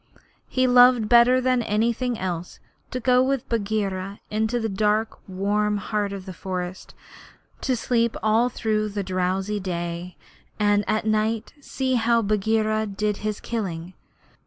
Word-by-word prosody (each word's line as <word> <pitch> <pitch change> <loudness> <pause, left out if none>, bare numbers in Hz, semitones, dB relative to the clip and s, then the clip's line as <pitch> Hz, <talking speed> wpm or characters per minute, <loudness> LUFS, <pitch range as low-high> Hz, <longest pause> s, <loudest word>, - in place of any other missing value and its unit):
He 255 0 +1
loved 245 -2 +6
better 240 +2 +6
than 255 -1 +2
anything 235 +3 0
else 180 -2 -4 0.3
to 255 - -3
go 250 +1 +4
with 265 -1 0
Bagheera 200 -3 -2
into 220 +3 0
the 225 - -1
dark 210 +2 0
warm 205 +2 0
heart 205 0 -2
of 195 -2 -7
the 190 - -7
forest, 180 0 -6 0.7
to 260 - +1
sleep 235 -1 0
all 220 +3 +3
through 215 -2 -1
the 205 -1 -3
drowsy 190 +2 -1
day, 175 -1 -4 0.4
and 205 0 +3
at 215 0 0
night 215 +1 0
see 265 -1 -2
how 230 0 +3
Bagheera 215 +1 +1
did 210 +1 -2
his 210 -1 -3
killing. 185 -6 -4
215 Hz, 140 wpm, -24 LUFS, 195-230 Hz, 0.7 s, loved